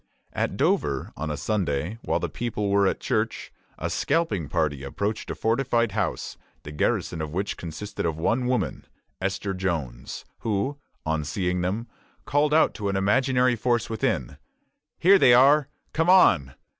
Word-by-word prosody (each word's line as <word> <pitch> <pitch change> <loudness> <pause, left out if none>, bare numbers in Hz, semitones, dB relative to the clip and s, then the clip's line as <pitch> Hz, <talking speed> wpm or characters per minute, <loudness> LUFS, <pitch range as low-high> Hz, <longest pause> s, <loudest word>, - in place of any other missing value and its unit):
At - - -1
Dover, - - 0
on 80 +1 -4
a 75 - -3
Sunday, 90 0 -1
while - - 0
the - - -2
people 105 -4 -3
were 100 -1 +4
at - - -1
church, - - -2 0.2
a - - -3
scalping 105 - 0
party 75 -4 0
approached 100 +10 -3
a - - -3
fortified 120 -1 +1
house, 100 0 -2 0.3
the 75 - -8
garrison 80 +2 -1
of 80 - -3
which 100 +2 -1
consisted 85 +5 -6
of 80 -2 -1
one 120 +10 0
woman, 125 0 -1 0.3
Esther 95 +1 -2
Jones, 80 -10 -4
who, 115 +7 -1 0.3
on 80 -1 0
seeing 90 +4 -1
them, 100 +7 -2 0.4
called 145 +2 +2
out 160 +1 +4
to 105 -2 -3
an 100 - -1
imaginary 125 +5 +2
force 120 0 0
within, 65 - -1 0.6
"Here 195 +3 +6
they 120 -7 +7
are! 140 +3 +5 0.3
come 165 +2 +1
on! 90 - +5
100 Hz, 155 wpm, -25 LUFS, 80-125 Hz, 0.6 s, they